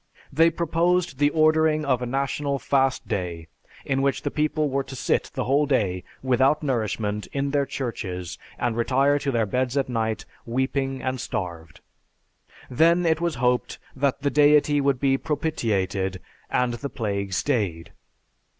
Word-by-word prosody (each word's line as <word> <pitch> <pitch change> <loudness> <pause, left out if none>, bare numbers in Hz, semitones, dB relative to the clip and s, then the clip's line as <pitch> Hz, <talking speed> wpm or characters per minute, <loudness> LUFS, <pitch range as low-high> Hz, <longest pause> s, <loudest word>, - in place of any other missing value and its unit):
They 165 +4 +5
proposed 170 -1 0
the 145 0 +4
ordering 155 0 +3
of 130 -3 +1
a 125 - -2
national 140 +2 -1
fast 135 -1 +1
day 85 -3 -3 0.4
in 135 0 0
which 140 0 0
the - - -2
people 155 0 0
were 140 0 0
to 135 0 -9
sit - - 0
the - - -1
whole 145 +3 +2
day 95 -10 0 0.2
without 130 +4 +2
nourishment 105 -5 -1
in 140 0 -1
their 140 -1 +1
churches 90 - -5 0.2
and 120 -2 -1
retire 135 +4 +2
to 140 - -2
their 115 -4 +1
beds 125 +5 -1
at 135 - 0
night 110 -2 -2 0.2
weeping 130 +2 -2
and 130 -1 -2
starved. 85 -7 -5 0.9
Then 170 +7 +3
it 160 0 +2
was 170 -3 0
hoped 125 0 0 0.2
that 140 0 0
the 140 - +1
Deity 145 0 +4
would 140 -2 +1
be 135 -1 +2
propitiated, 100 - -1 0.3
and 125 -1 +1
the 140 +4 -5
plague 100 -5 -3
stayed. 95 - -1
135 Hz, 155 wpm, -24 LUFS, 115-145 Hz, 0.9 s, They